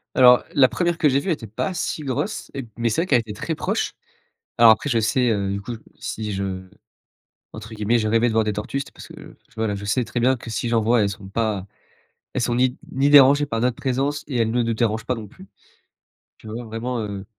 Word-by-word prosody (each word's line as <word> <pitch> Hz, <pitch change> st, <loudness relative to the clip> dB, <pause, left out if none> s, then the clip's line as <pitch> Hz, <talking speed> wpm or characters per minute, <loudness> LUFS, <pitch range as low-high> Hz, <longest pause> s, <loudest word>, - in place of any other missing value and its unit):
Alors 125 Hz, -1 st, +7 dB
la 135 Hz, -4 st, +6 dB
1re 175 Hz, -2 st, 0 dB
que 150 Hz, -, +4 dB
j'ai 135 Hz, -, +2 dB
vue 175 Hz, +5 st, -2 dB
était 120 Hz, -8 st, -3 dB
pas 110 Hz, -, -3 dB
si 155 Hz, -2 st, -3 dB
grosse 140 Hz, -, -3 dB
et 135 Hz, -4 st, -6 dB
mais 115 Hz, 0 st, +1 dB
c'est 115 Hz, -, 0 dB
vrai 180 Hz, -, -2 dB
qu'elle 130 Hz, -9 st, +4 dB
été 105 Hz, -2 st, -8 dB
très 160 Hz, +9 st, -4 dB
proche, -, -, -2 dB, 0.6 s
alors 115 Hz, -1 st, +8 dB
après 110 Hz, +6 st, +1 dB
je 115 Hz, -3 st, +2 dB
sais, 125 Hz, +3 st, +2 dB
heu, 100 Hz, -2 st, -1 dB
du 100 Hz, -, -4 dB
coup 120 Hz, -, -7 dB, 0.3 s
si 105 Hz, -2 st, -4 dB
je 95 Hz, -1 st, -4 dB, 0.8 s
entre 110 Hz, +1 st, -9 dB
guillemets 110 Hz, +2 st, +1 dB
«je 110 Hz, -, -1 dB
rêvais 115 Hz, +2 st, +3 dB
de 110 Hz, -, -3 dB
voir 110 Hz, -1 st, +2 dB
des 105 Hz, -, 0 dB
tortues» 105 Hz, +6 st, -3 dB
c'était 140 Hz, -, -7 dB
parce -, -, -12 dB
que, -, -, -12 dB, 0.2 s
voilà, 110 Hz, -2 st, -1 dB
je 100 Hz, -, -7 dB
sais 115 Hz, +4 st, 0 dB
très 115 Hz, +1 st, -3 dB
bien 130 Hz, +1 st, +3 dB
que 115 Hz, -, -10 dB
si 115 Hz, +1 st, -2 dB
j'en 115 Hz, -1 st, +3 dB
voie, 115 Hz, +1 st, +3 dB
elles 100 Hz, -, +2 dB
sont 100 Hz, -1 st, -8 dB
pas 105 Hz, -2 st, -2 dB, 0.7 s
elles -, -, 0 dB
sont 120 Hz, 0 st, 0 dB
ni 125 Hz, 0 st, +2 dB
ni 135 Hz, +2 st, +1 dB
dérangées 145 Hz, 0 st, +7 dB
par 115 Hz, -3 st, -2 dB
notre 125 Hz, 0 st, +1 dB
présence 140 Hz, +3 st, -1 dB
et 130 Hz, -4 st, -3 dB
elles 115 Hz, -1 st, +2 dB
ne 120 Hz, +2 st, +1 dB
nous 115 Hz, 0 st, -1 dB
dérangent 110 Hz, -1 st, -1 dB
pas 130 Hz, -, 0 dB
non 110 Hz, -4 st, -8 dB
plus. 190 Hz, -, -15 dB, 0.9 s
Tu -, -, -14 dB
vois, 115 Hz, +3 st, -5 dB
vraiment, 115 Hz, +2 st, -4 dB
heu, 100 Hz, -2 st, -5 dB
115 Hz, 240 wpm, -22 LUFS, 110-130 Hz, 0.9 s, alors